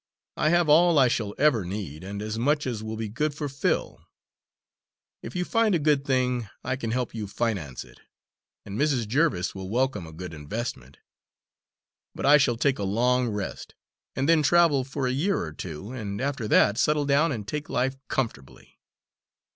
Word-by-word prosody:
I 155 - +2
have 175 0 +3
all 165 +2 +5
I 135 -2 +6
shall 110 -4 -2
ever 135 -8 +3
need, 90 -4 -6
and 100 +2 -5
as 110 +1 -4
much 145 +4 +1
as 120 -4 -3
will 110 0 -5
be 110 0 -3
good 145 +8 -2
for 150 -1 -3
Phil. 135 -1 -1 1.2
If 115 - -8
you 180 - -1
find 225 -2 +2
a - - +4
good 145 -2 +2
thing, 125 -4 0
I 130 +1 -1
can 120 -4 -4
help 125 +1 -2
you 110 -2 -4
finance 95 - -3
it; - - -18 0.7
and 100 +2 -6
Mrs. 135 -7 +1
Jerviss 130 - +1
will 95 -1 -7
welcome 125 -6 0
a - - -10
good 90 +2 -8
investment. 75 - -6 1.2
But - - -4
I 145 +2 +8
shall 120 -5 +2
take 130 0 +1
a - - -2
long 125 +5 +2
rest, 105 -3 -5 0.4
and 135 +1 0
then 165 -1 +5
travel 155 -3 +4
for 135 +1 -3
a 125 - +1
year 185 +9 +1
or 80 -3 -4
two, 85 +6 -7
and 105 -6 -5
after 135 -4 -2
that 105 +1 +4
settle 150 -1 +2
down 145 +3 +3
and 105 -6 -5
take 150 +5 -4
life 130 +2 0
comfortably." 110 - -5
125 Hz, 185 wpm, -26 LUFS, 105-145 Hz, 1.2 s, I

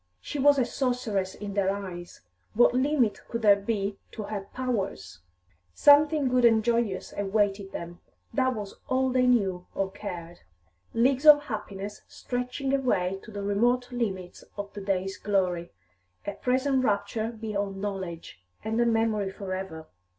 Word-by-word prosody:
She 290 - -5
was 285 +1 +5
a 255 - +3
sorceress 240 -7 -1
in 205 -1 -6
their 195 -1 +1
eyes; 185 -3 -6 0.3
what 240 +2 +5
limit 260 -3 +2
could 230 -1 -4
there 205 -2 +7
be 200 -1 -2
to 215 - -5
her 200 -1 -5
powers? 200 - -3 0.6
Something 295 0 +6
good 250 0 +2
and 225 -2 +5
joyous 230 -4 0
awaited 200 -1 0
them; 170 +1 -7 0.3
that 260 -1 +1
was 205 -2 -7
all 260 0 +2
they 250 0 +3
knew 190 -7 +2
or 195 -1 -1
cared; 175 -4 -7 0.6
leagues 260 +5 +3
of 290 -1 +9
happiness, 205 -5 -6
stretching 250 +2 -3
away 195 -9 +1
to - - -13
the 205 -2 -6
remote 240 +6 +1
limits 190 -7 -3
of 200 0 -6
the 205 - -7
day's 195 0 -1
glory; 180 -4 0 0.5
a - - -2
present 260 +4 +1
rapture 220 0 0
beyond 200 -3 -3
knowledge, 190 - -5 0.2
and 220 +2 0
a 235 - +3
memory 225 -3 +1
for 190 -1 -6
ever. 175 -4 -6
210 Hz, 150 wpm, -27 LUFS, 195-250 Hz, 0.6 s, of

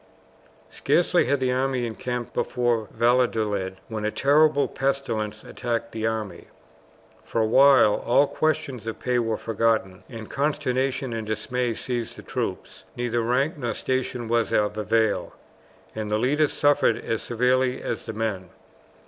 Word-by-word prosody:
Scarcely - - +2
had 140 +2 +1
the 130 -1 +1
army 130 -1 0
encamped 120 +1 -4
before 120 -3 0
Valladolid 110 -5 +1
when 110 -2 -5
a 105 - +1
terrible 145 +4 +3
pestilence 115 -6 -2
attacked 115 -1 -3
the 110 0 -2
army. 110 -5 -4 0.8
For - - -3
a - - +3
while 130 -2 +5
all 135 +4 +4
questions 140 -6 -2
of 115 - -4
pay 125 -1 0
were 115 -2 -1
forgotten, 110 -4 0
and 115 -4 -8
consternation 135 -3 -1
and 110 -1 -4
dismay 115 +2 -2
seized 120 -1 -3
the - - -11
troops. - - -5
Neither 120 -1 -1
rank 135 +7 0
nor 120 -3 -2
station 130 -2 -2
was 115 0 +1
of 105 0 +1
avail, 110 0 0 0.6
and 110 -1 -4
the 105 - +2
leaders 145 +6 +2
suffered 145 -5 +3
as 115 - -3
severely 125 +2 +1
as - - -4
the 110 - -4
men. 105 -5 -3
120 Hz, 145 wpm, -25 LUFS, 110-130 Hz, 0.8 s, while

